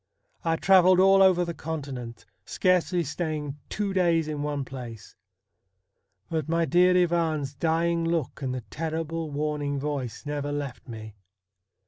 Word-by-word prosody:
I 165 -2 +1
travelled 185 +1 +5
all 195 +1 +6
over 185 -2 +5
the 170 - -4
Continent, 140 -7 -6 0.2
scarcely 180 -1 +1
staying 150 -2 -4
two 205 -2 -2
days 170 -4 +2
in 150 -1 -3
one 145 -2 -2
place. 120 -5 -9 1.1
But 160 -3 -3
my 165 0 +2
dear 180 +4 +4
Ivan's 165 -5 +1
dying 165 +3 +1
look 165 -5 -2
and 130 -2 -2
the 130 - -4
terrible 160 0 -3
warning 145 -1 -2
voice 135 -4 -4
never 145 0 -3
left 145 -2 -5
me. 110 -3 -8
155 Hz, 135 wpm, -26 LUFS, 145-170 Hz, 1.1 s, all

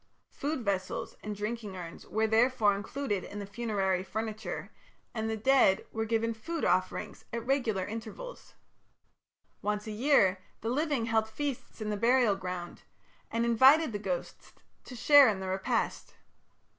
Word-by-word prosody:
Food 285 -4 -3
vessels 190 -2 -2
and 210 0 -5
drinking 210 -1 -4
urns 170 -2 -9
were 220 +1 +1
therefore 220 -1 +3
included 205 0 -3
in 205 - -8
the 205 - -4
funerary 200 -4 -1
furniture, 220 +2 -5 0.4
and 220 -1 -2
the 220 - -2
dead 220 -4 +4
were 220 0 -2
given 230 +1 0
food 325 +10 -4
offerings - - -1
at 235 0 -4
regular 240 -8 0
intervals. 225 - -8 1.1
Once 210 0 -1
a 215 - -5
year 210 -5 +3 0.2
the 225 - -2
living 285 -2 0
held 220 -1 +1
feasts 275 -1 -5
in 215 0 -2
the 210 - -1
burial 235 -1 +4
ground, 180 -2 -6 0.5
and 230 +1 0
invited 260 +6 +6
the 205 - -3
ghosts 185 -4 -5 0.3
to 250 - -9
share 280 +3 +7
in 200 -3 -1
the 190 - -5
repast. 190 +1 -2
220 Hz, 150 wpm, -30 LUFS, 205-245 Hz, 1.1 s, share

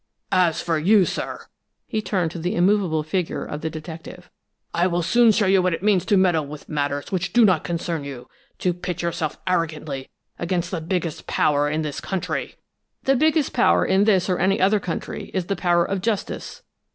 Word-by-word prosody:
"As 175 -3 +2
for 165 -2 0
you, 195 +4 +5
sir!" - - -4 0.4
He 220 -3 -2
turned 185 -6 -1
to 170 - -6
the 175 +3 -2
immovable 180 -4 +2
figure 170 +2 -2
of 150 - -6
the 160 - -2
detective. 160 +2 -9 0.4
"I 175 +2 +2
will 175 -1 0
soon 235 +5 +5
show 210 0 +2
you 190 0 +4
what 180 -2 +1
it 175 - -10
means 205 -4 +3
to 205 - +3
meddle 175 -6 +2
with 150 0 -10
matters 145 -1 -2
which 180 -2 -2
do 240 -1 +6
not 185 -6 +3
concern 170 -2 -3
you 135 -3 -8 0.3
to 180 - 0
pit 180 0 -5
yourself 165 -3 -2
arrogantly 155 -6 -2 0.3
against 175 0 -1
the 175 -4 -2
biggest 170 -1 -3
power 145 0 +2
in 155 +1 -1
this 150 -2 -4
country!" 190 -2 -3 0.5
"The 270 - +3
biggest 310 +1 +2
power 245 - +4
in 190 +2 +3
this 195 -4 +3
or 185 -2 0
any 195 +2 +2
other 200 +3 +3
country 175 -3 -5
is 185 -2 0
the 195 - -1
power 175 -2 +2
of 195 -1 -2
justice." 225 - -3
175 Hz, 195 wpm, -23 LUFS, 160-195 Hz, 0.5 s, do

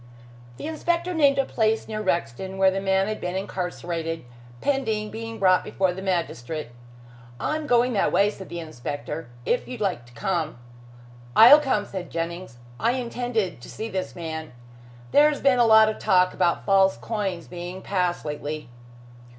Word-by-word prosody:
The - - -7
inspector 340 +3 -1
named 285 -4 +4
a 275 - +2
place 220 -2 0
near 215 -1 -4
Rexton 185 - -2
where 190 0 +5
the 195 +1 -2
man 190 0 +2
had 215 0 -4
been 180 +1 -3
incarcerated, 175 -5 -4 0.3
pending 220 - -1
being 225 +1 -6
brought 185 -1 +4
before 190 -2 0
the 190 - -7
magistrate. 160 -7 -2 0.7
"I 305 - -1
am 310 -1 -4
going 245 0 +3
that 200 - +2
way," 200 +3 +3
said 190 -2 -10
the 170 - -5
inspector. 150 0 -6 0.2
"If 245 - 0
you 250 - -6
like 185 - -2
to 120 - -18
come 160 +3 -2 0.4
" 120 0 -20
"I'll 245 +7 +10
come," 260 -8 0
said 185 -3 -6
Jennings. 170 -5 -5 0.2
"I 235 +2 +2
intended 235 - -2
to - - -11
see 220 +1 -5
this 185 -1 -4
man. 160 -4 -6 0.6
There 295 +1 +6
has 295 - -3
been 270 -3 +3
a 235 - +5
lot 220 0 +7
of 215 - -2
talk 185 -3 +3
about 175 -2 +1
false 195 -1 +4
coins 195 -6 -3
being 180 +1 -7
passed 180 -4 -1
lately." 150 -2 -5
190 Hz, 175 wpm, -25 LUFS, 170-225 Hz, 0.7 s, I'll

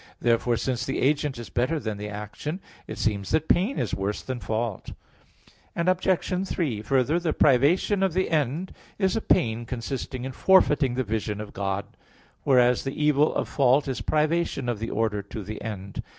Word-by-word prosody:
Therefore, 120 0 +2
since 125 +1 -1
the 135 +1 -2
agent 145 -1 +1
is 120 - -8
better 150 +7 0
than 110 -6 -4
the 105 0 -5
action, 105 - -5 0.3
it - - -6
seems 100 -3 -1
that 160 0 +1
pain 195 +10 +2
is - - -2
worse 95 +3 -2
than 130 -2 -4
fault. 110 -2 -3 0.8
Obj. 185 +1 +1
3: 135 - -1
Further, 135 +7 +2
the 170 -3 -1
privation 150 - +3
of 190 -3 +2
the 185 0 0
end 155 +4 0 0.2
is 190 -2 +1
a 225 - 0
pain 115 - +1
consisting 125 +1 -5
in 135 - -4
forfeiting 140 -5 +4
the 130 - 0
vision 105 -2 -2
of 105 -1 -7
God; 100 0 -2 0.6
whereas 125 -3 +4
the 135 +1 -4
evil 150 0 +3
of - - -1
fault 140 +1 +3
is 130 -2 -3
privation 155 -3 0
of 120 -4 -1
the 115 - -3
order 105 -1 0
to 100 +1 -7
the 105 +2 -7
end. 100 -3 -5
130 Hz, 180 wpm, -26 LUFS, 110-155 Hz, 0.8 s, forfeiting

